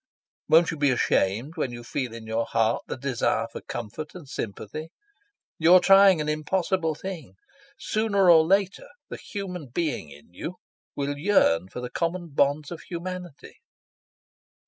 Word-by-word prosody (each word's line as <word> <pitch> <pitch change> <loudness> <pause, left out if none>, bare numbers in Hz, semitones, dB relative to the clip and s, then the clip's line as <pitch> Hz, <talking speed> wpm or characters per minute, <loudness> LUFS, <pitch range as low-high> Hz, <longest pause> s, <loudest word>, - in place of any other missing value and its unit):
Won't 165 +1 +5
you 160 - -5
be 145 -1 +3
ashamed 120 - 0
when 135 -5 -1
you 120 0 -8
feel 125 0 -3
in 115 -1 -9
your 110 +1 -1
heart 115 0 +1
the - - -4
desire 125 -3 0
for - - -7
comfort 135 - -7
and 170 -6 -10
sympathy? 115 +7 -6 0.7
You're 170 +3 +7
trying 195 -2 +6
an 150 - -2
impossible 160 +2 0
thing. 160 - -7 0.4
Sooner 210 -3 +1
or 165 -2 +8
later 195 +3 +1 0.2
the - - -6
human 180 -7 -6
being 145 - -3
in 75 +4 -16
you 170 - -6 0.4
will 145 0 -3
yearn 95 - +3
for 125 - -7
the 125 0 -6
common 170 0 -2
bonds 145 +1 +1
of 170 - -7
humanity." 180 -3 -8
155 Hz, 150 wpm, -26 LUFS, 120-180 Hz, 0.7 s, or